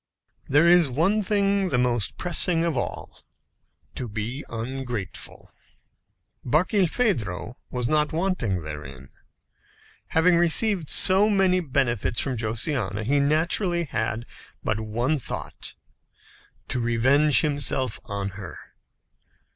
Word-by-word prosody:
There 145 +5 +4
is 175 -4 +5
one 180 - +1
thing 200 -1 +1
the 130 - +1
most 120 -4 0
pressing 175 -1 +3
of 165 -3 -1
all: 120 - -5 0.7
to 125 -3 -5
be 110 +7 -5
ungrateful. 120 -3 -6 0.9
Barkilphedro 160 - 0 0.2
was 125 -2 -3
not 150 +2 +2
wanting 155 - -1
therein. 70 -4 -9 1.0
Having 170 +2 +3
received 175 0 +4
so 195 +3 +5
many 190 -3 +3
benefits 130 - -1
from 135 -2 -1
Josiana, 110 - -2
he 125 +6 -1
had 140 -1 +3
naturally 170 +3 0 0.8
but 110 0 -1
one 120 +7 -1
thought - - -6 0.9
to 130 - -1
revenge 130 +5 +3
himself 140 -5 +1
on 100 -1 -4
her. 95 -2 -9
140 Hz, 105 wpm, -24 LUFS, 115-170 Hz, 1.0 s, is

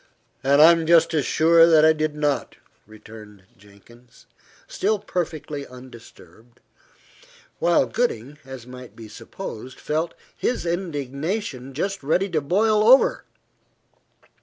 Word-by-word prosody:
"And 140 +2 +5
I 165 - +9
am 165 -1 0
just 170 0 +4
as 150 -4 0
sure 165 +1 +4
that 160 -2 +5
I 160 - +5
did 155 -1 -3
not," 150 -2 -2 0.3
returned 105 -2 -14
Jenkins, 105 +5 -21 0.4
still 215 +2 -1
perfectly 155 -7 -5
undisturbed, 120 -2 -16 1.0
while 170 0 +2
Gooding, 145 - -3
as 130 -3 -10
might 125 0 -12
be 115 -1 -11
supposed, 125 - -10
felt 160 +3 -3 0.2
his 245 - -2
indignation 150 - -4
just 195 +6 -3
ready 180 +8 0
to 160 -4 -1
boil 210 +8 +1
over. 255 +5 +4
150 Hz, 120 wpm, -22 LUFS, 125-170 Hz, 1.0 s, I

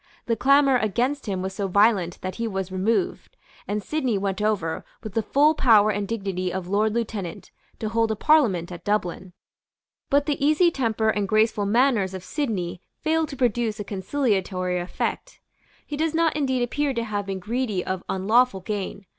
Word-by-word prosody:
The 230 - +1
clamour 275 +1 +4
against 245 +5 -1
him 190 -2 -2
was 190 0 -3
so 200 0 -2
violent 195 -3 +2
that 185 0 -5
he 230 0 -2
was 190 -3 -3
removed; 230 - -1 0.3
and 210 0 -2
Sidney 260 -7 -1
went 195 +1 -2
over, 200 -7 -1 0.2
with 215 -3 -7
the 225 - +1
full 285 +8 +3
power 220 -8 +5
and 205 0 -2
dignity 195 -4 -2
of 185 -1 -4
Lord 210 +3 +1
Lieutenant, 215 -7 -4 0.3
to 220 - -3
hold 225 +1 +1
a 220 - 0
Parliament 215 - +3
at 175 -1 -8
Dublin. 190 -3 -2 0.8
But 285 +1 +3
the 285 -1 -1
easy 310 +4 +4
temper 225 -6 0
and 205 -2 -1
graceful 215 -1 +2
manners 220 -4 +2
of 185 - -7
Sidney 190 - -3 0.2
failed 320 0 0
to 275 - -6
produce 235 -3 0
a - - -2
conciliatory 190 -4 -1
effect. 175 +1 -4 0.5
He 295 - -5
does 320 +1 0
not 330 -2 +2
indeed 260 -4 0
appear 280 +2 -1
to 235 - -1
have 205 -3 -3
been 195 -1 -3
greedy 210 -1 -2
of 185 -1 -3
unlawful 210 +2 +2
gain. 200 0 -4
215 Hz, 180 wpm, -24 LUFS, 190-255 Hz, 0.8 s, power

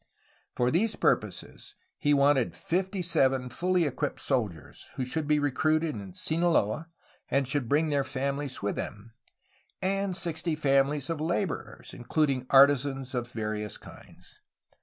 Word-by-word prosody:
For 125 0 +1
these 210 +7 +1
purposes - - -2 0.2
he 145 - +2
wanted 140 -3 +3
fifty 185 +2 -2
seven 135 -7 +2
fully 180 +6 +1
equipped 145 +1 -2
soldiers, 105 - -3
who 130 - -2
should 150 +4 -3
be 150 0 +3
recruited 155 +3 +1
in 100 -5 -8
Sinaloa 160 -4 +1 0.4
and 135 -1 +1
should 135 -3 -1
bring 155 +2 +2
their 140 -2 +1
families 140 -1 -3
with 100 - -1
them, 105 +3 -6 0.7
and 195 0 -1
sixty 165 -2 -1
families 140 0 +1
of 160 -2 -3
laborers, 170 +3 -3
including 130 0 0
artisans 135 -1 +4
of 120 -2 -2
various 105 -2 -4
kinds. - - -15
145 Hz, 135 wpm, -28 LUFS, 130-160 Hz, 0.7 s, artisans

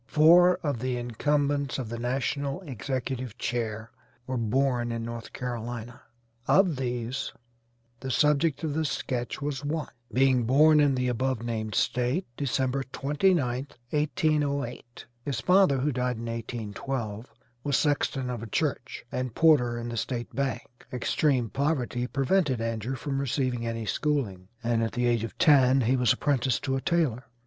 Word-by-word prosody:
Four 175 +5 +6
of 145 -6 -1
the 125 +1 -1
incumbents 140 +3 0
of 125 -5 -4
the 120 0 -5
national 135 +5 -2
executive 130 - -4
chair 110 -2 -3 0.3
were 130 - -3
born 120 +1 +1
in 115 0 -3
North 115 -1 -7
Carolina. 120 -1 -5 0.5
Of 185 -6 +4
these, 125 0 -3 0.7
the 135 - -5
subject 150 +4 +2
of 155 -3 -1
this 155 -1 0
sketch 125 -1 -3
was 145 -1 -3
one, 150 0 -2 0.2
being 130 0 +3
born 150 +5 +6
in 145 -2 +4
the 125 0 0
above 125 -1 -1
named 110 -2 -3
State, 125 +9 +1
December 135 -1 0
29th, 140 -1 0 0.2
1808. 145 -5 -1 0.2
His 135 -4 -2
father, 180 +2 +4
who 140 +3 0
died 125 -2 -1
in 115 - -6
1812, 115 0 -4 0.3
was 140 -3 +1
sexton 140 -3 0
of 120 -3 -4
a 115 - -6
church 135 0 -2
and 125 -2 -3
porter 135 -8 +4
in 120 0 -4
the 120 - -4
State 120 0 -3
bank. 135 -2 -1 0.3
Extreme 125 -1 +1
poverty 130 -4 -1
prevented 135 0 +1
Andrew 115 +2 -2
from 135 +1 -3
receiving 125 -3 -1
any 115 -1 -3
schooling, 105 -8 -1 0.2
and 115 -1 +1
at 115 - -1
the 120 0 0
age 120 -2 +2
of 115 - -6
ten 135 -5 +5
he 125 +3 +2
was 125 -3 +3
apprenticed 130 -4 +1
to 135 -1 0
a 135 - -1
tailor. 140 -9 0
130 Hz, 155 wpm, -27 LUFS, 120-145 Hz, 0.7 s, Four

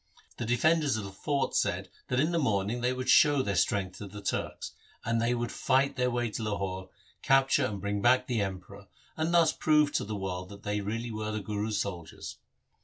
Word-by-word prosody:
The 120 - -4
defenders 145 +2 +2
of 110 - -4
the 100 - -7
fort 140 +7 -1
said, - - 0 0.2
that 125 - 0
in 155 +5 +2
the 170 - +1
morning 110 -3 0
they 125 +1 +2
would 130 0 -4
show 145 0 +6
their 100 -4 -1
strength 95 +1 0
to 105 - -6
the 105 +2 -9
Turks, 100 - -3 0.3
that 115 0 +1
they 120 +2 +1
would 120 0 -2
fight 135 +1 +1
their 125 -1 +1
way 120 -2 -1
to 115 - -4
Lahore, 95 -3 -3 0.3
capture 135 0 +3
and 100 -4 -5
bring 100 +1 -2
back 130 +3 +4
the 120 -4 0
Emperor, 95 +1 -6 0.3
and 160 +1 -1
thus 170 -2 +5
prove 150 -2 +3
to - - 0
the 105 +1 -4
world 90 -1 -4
that 100 0 -12
they 105 0 -1
really 115 +4 -3
were 110 0 -3
the 110 - -2
Guru's 105 +1 -2
soldiers. 85 -5 -6
110 Hz, 210 wpm, -29 LUFS, 100-130 Hz, 0.3 s, show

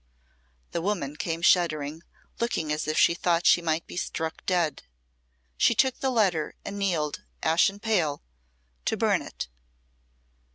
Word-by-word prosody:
The 170 - -2
woman 170 -7 -2
came 165 +1 -3
shuddering, 155 -4 +2 0.4
looking 165 -10 -1
as 150 - -3
if 155 +1 -1
she 170 - +5
thought 175 0 +1
she 175 - +6
might 160 -1 -1
be - - -9
struck 160 -2 -3
dead. 170 -6 +1 0.8
She 235 - +4
took 260 +3 +2
the 265 - 0
letter 190 -11 +1
and 200 0 -5
kneeled, 165 -7 -1 0.2
ashen 175 +5 +3
pale, 185 -10 0 0.6
to - - 0
burn - - +2
it. - - -6
170 Hz, 140 wpm, -27 LUFS, 155-195 Hz, 0.8 s, she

